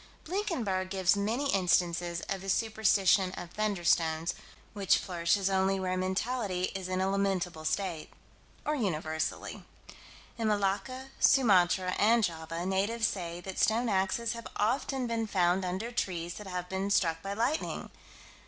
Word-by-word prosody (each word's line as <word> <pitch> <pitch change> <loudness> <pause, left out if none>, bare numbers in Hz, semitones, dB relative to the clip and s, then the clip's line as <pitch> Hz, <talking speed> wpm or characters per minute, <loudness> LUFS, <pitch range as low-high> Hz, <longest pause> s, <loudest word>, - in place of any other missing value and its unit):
Blinkenberg 255 - -2
gives 190 -1 +2
many 230 +8 0
instances 175 -2 +1
of 195 -1 -4
the 195 - -6
superstition 195 -3 +3
of 175 -2 -8
"thunderstones" 170 -5 +1 0.4
which 200 -3 +3
flourishes 180 +2 0
only 190 0 +2
where 185 -1 -1
mentality 185 0 -1
is 190 -2 -4
in 185 0 -1
a 190 - +1
lamentable 190 -4 -1
state 165 0 -2 0.6
or 300 - +1
universally. 160 - -2 0.8
In 225 - 0
Malacca, 215 +6 -1
Sumatra, 185 -7 +4
and 225 +2 +4
Java, 165 -1 -3
natives 200 +5 +1
say 175 -4 -3
that 190 +1 -6
stone 230 +2 +2
axes 200 +4 0
have 230 -1 -7
often 255 +4 0
been 230 -1 -1
found 185 -1 +2
under 190 +6 -3
trees 175 -7 -2
that 210 +1 -9
have 180 -1 -4
been 190 +2 -2
struck 165 -5 +2
by 195 +2 -4
lightning. 245 +8 -1
190 Hz, 140 wpm, -30 LUFS, 180-220 Hz, 0.8 s, Sumatra